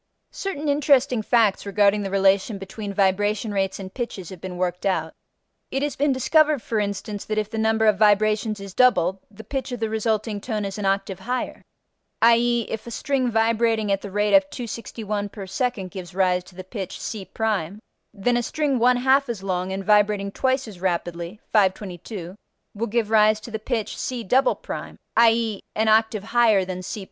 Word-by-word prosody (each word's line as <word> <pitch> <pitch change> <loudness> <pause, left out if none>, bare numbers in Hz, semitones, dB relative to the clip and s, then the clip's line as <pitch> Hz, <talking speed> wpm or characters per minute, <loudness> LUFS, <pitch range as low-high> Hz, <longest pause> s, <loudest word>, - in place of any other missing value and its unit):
Certain 310 -7 -4
interesting 280 -4 +3
facts 220 -3 +2
regarding 205 0 +2
the 195 - -3
relation 195 +2 +2
between 195 +2 -6
vibration 205 +2 +1
rates 195 -1 -1
and 190 -1 -8
pitches 220 -8 -5
have 185 -3 -10
been 185 -1 -6
worked 180 0 -2
out: 165 -5 0 0.6
it 270 +1 -1
has 290 - -2
been 290 +1 +2
discovered 300 +3 +3
for 225 -1 -2
instance 205 0 -3
that 215 - -3
if 215 0 -1
the 225 - -4
number 220 0 +2
of 210 -2 +3
vibrations 215 0 +3
is 195 -1 -8
doubled, 195 -7 +3
the 215 +1 -12
pitch 265 +3 -4
of 245 - -4
the 225 -1 -2
resulting 220 -1 -1
tone 215 -2 -3
is 195 +1 -5
an 200 - -1
octave 195 -1 -1
higher; 250 +6 -3 0.6
i.e., 235 +1 +4
if 220 +1 -6
a - - -5
string 255 +1 -1
vibrating 225 -1 +1
at 195 0 +1
the 200 - -7
rate 205 +1 0
of 195 0 +5
261 215 -3 -5
per 200 -1 -8
second 195 -2 -2
gives 180 -1 -8
rise 180 -1 +2
to 180 - -17
the 185 - -7
pitch 190 -1 -6
c', 205 -5 -5 0.8
then 225 +3 0
a - - +1
string 285 0 -1
one 250 +1 +4
half 265 +2 +3
as 215 -5 -4
long 185 -1 -2
and 195 0 -4
vibrating 205 -1 +3
twice 260 +3 0
as 190 -5 -11
rapidly 175 +1 -2
(522) 190 -2 -1 0.4
will 225 +3 -3
give 225 0 -1
rise 215 0 +5
to 230 - -10
the 220 - -3
pitch 220 -1 -3
c'', 245 -3 -4 0.9
i.e., 225 -2 +3
an 220 +1 +1
octave 220 -1 +3
higher 220 -4 +3
than 185 0 -5
c'. 190 +3 -5
210 Hz, 185 wpm, -23 LUFS, 195-235 Hz, 0.9 s, of